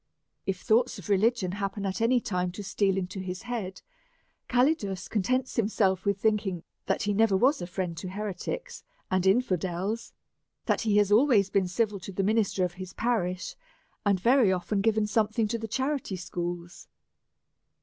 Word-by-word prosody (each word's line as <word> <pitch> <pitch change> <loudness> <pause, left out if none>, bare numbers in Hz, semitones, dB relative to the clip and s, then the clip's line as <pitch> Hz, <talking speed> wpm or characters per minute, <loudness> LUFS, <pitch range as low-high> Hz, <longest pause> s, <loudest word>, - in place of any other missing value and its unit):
If 190 -2 -2
thoughts 240 +3 +2
of - - -10
religion 205 -1 +2
happen 200 +1 -3
at 195 +3 -2
any 245 +2 +4
time 180 -7 -2
to 205 - -6
steal 195 0 +1
into 190 +1 -3
his 185 +1 -5
head, 225 -6 -5 0.7
Calidus 245 - +1
contents 255 +5 -1
himself 195 -4 +1
with 200 -1 +1
thinking 200 -5 0 0.2
that - - 0
he 205 0 +1
never 210 -1 +3
was 270 +8 +3
a 175 - -4
friend 180 -2 -3
to 180 +3 -5
heretics 210 - -5 0.3
and 185 0 +2
infidels, 190 0 0 0.5
that - - +1
he 215 -2 +2
has 205 -1 +3
always 215 -4 +4
been 195 -2 +2
civil 205 +2 0
to 185 +2 -8
the 195 +1 -1
minister 205 -3 +2
of 175 - -4
his 185 -1 -7
parish, 185 -6 -1 0.5
and 200 -2 +2
very 235 0 +4
often 190 +2 0
given 220 0 +2
something 215 +1 +1
to 230 +1 -1
the 225 - -4
charity 265 -2 -2
schools. 175 -1 -5
200 Hz, 165 wpm, -28 LUFS, 185-225 Hz, 0.7 s, any